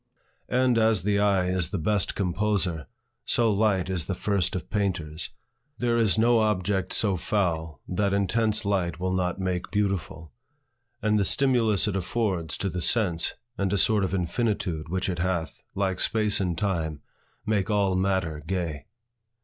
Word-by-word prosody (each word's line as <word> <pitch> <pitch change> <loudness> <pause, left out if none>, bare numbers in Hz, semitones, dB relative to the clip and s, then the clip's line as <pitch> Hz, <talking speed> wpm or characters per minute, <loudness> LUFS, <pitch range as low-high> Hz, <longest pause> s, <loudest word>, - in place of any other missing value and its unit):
And 125 -2 +3
as 110 -4 +3
the 100 0 +2
eye 100 -3 +2
is 90 -3 +1
the 100 - -2
best 100 +4 0
composer, 95 -3 -1 0.4
so 115 -3 +2
light 100 -3 +2
is 90 -4 -2
the 95 - -2
first 100 -2 0
of 90 - -4
painters. 85 -7 -2 0.5
There 120 -1 +1
is 110 -2 +3
no 115 +1 +4
object 100 -3 0
so 100 -3 +2
foul 80 -6 -1
that 100 +2 0
intense 105 +2 +1
light 90 -5 0
will 95 0 -1
not 90 -1 0
make 90 -1 -2
beautiful. 85 -6 -2 0.7
And 105 0 +3
the - - +3
stimulus 115 -4 +3
it 105 - -1
affords 95 -3 -1
to 100 - -2
the 90 0 -3
sense, 90 -6 +1 0.2
and 100 -1 0
a 100 - +2
sort 105 +1 +3
of 95 0 -1
infinitude 90 -4 -1
which 95 +1 -1
it 90 -3 -2
hath, 85 -2 -2
like 95 -2 -1
space 105 -2 +2
and 90 -4 -1
time, 80 -7 -2 0.4
make 105 -2 0
all 100 -3 +2
matter 95 -5 0
gay. 80 -4 -3
95 Hz, 160 wpm, -26 LUFS, 90-105 Hz, 0.7 s, no